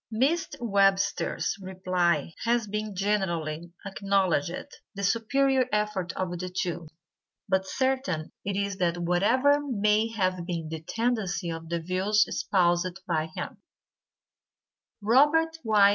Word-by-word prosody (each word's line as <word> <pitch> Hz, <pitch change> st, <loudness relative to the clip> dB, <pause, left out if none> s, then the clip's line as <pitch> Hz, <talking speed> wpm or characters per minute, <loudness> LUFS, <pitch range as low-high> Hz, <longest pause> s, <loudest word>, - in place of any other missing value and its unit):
Mr. 280 Hz, +10 st, +1 dB
Webster's 195 Hz, -4 st, +1 dB
reply 180 Hz, -4 st, 0 dB
has 235 Hz, -1 st, +2 dB
been 210 Hz, 0 st, -4 dB
generally 175 Hz, -5 st, -1 dB
acknowledged 195 Hz, -, -1 dB, 0.2 s
the 200 Hz, -, -5 dB
superior 260 Hz, +5 st, +2 dB
effort 210 Hz, -4 st, -1 dB
of 180 Hz, -2 st, -3 dB
the 185 Hz, 0 st, -4 dB
two; 175 Hz, -2 st, -3 dB, 0.6 s
but 190 Hz, 0 st, +1 dB
certain 260 Hz, -, -1 dB
it 200 Hz, 0 st, -2 dB
is 200 Hz, -1 st, -1 dB
that 175 Hz, -2 st, +1 dB
whatever 220 Hz, +12 st, +3 dB
may 215 Hz, -5 st, +2 dB
have 185 Hz, -5 st, -1 dB
been 165 Hz, -3 st, -3 dB
the 160 Hz, -1 st, -5 dB
tendency 195 Hz, -3 st, -1 dB
of 165 Hz, 0 st, -7 dB
the 170 Hz, 0 st, -1 dB
views 190 Hz, +5 st, +2 dB
espoused 175 Hz, -1 st, +1 dB
by 160 Hz, -2 st, 0 dB
him, -, -, -5 dB, 1.4 s
Robert 300 Hz, +9 st, +4 dB
Y. 210 Hz, -3 st, +5 dB
195 Hz, 120 wpm, -27 LUFS, 175-220 Hz, 1.4 s, Y